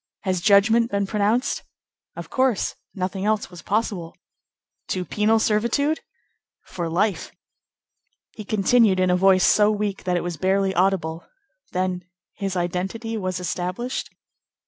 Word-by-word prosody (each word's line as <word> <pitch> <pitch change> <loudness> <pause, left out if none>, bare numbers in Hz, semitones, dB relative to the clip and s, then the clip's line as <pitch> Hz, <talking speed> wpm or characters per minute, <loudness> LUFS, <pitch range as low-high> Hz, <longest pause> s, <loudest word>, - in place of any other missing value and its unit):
Has 185 -2 -1
judgment 220 +4 +4
been 200 -2 0
pronounced?" 215 +6 0 0.5
"Of - - -8
course. 260 -5 +1 0.2
Nothing 190 0 -3
else 215 -2 0
was 175 - -10
possible." 200 -5 -2 0.7
"To 185 -1 -2
penal 215 +5 +2
servitude?" 235 +8 +1 0.6
"For 170 -2 -5
life." 190 +2 0 1.0
He 215 - -9
continued, 210 -1 +3
in 185 -1 +3
a - - +4
voice 185 0 +4
so 210 0 +5
weak 210 -2 -2
that 180 -1 +1
it - - -2
was 175 -2 -4
barely 190 +3 +1
audible:— 175 -3 0 0.4
"Then 185 0 -1 0.3
his 195 -2 -4
identity 190 +6 -2
was 185 -3 -2
established?" 180 +7 -3
195 Hz, 130 wpm, -23 LUFS, 180-215 Hz, 1.0 s, so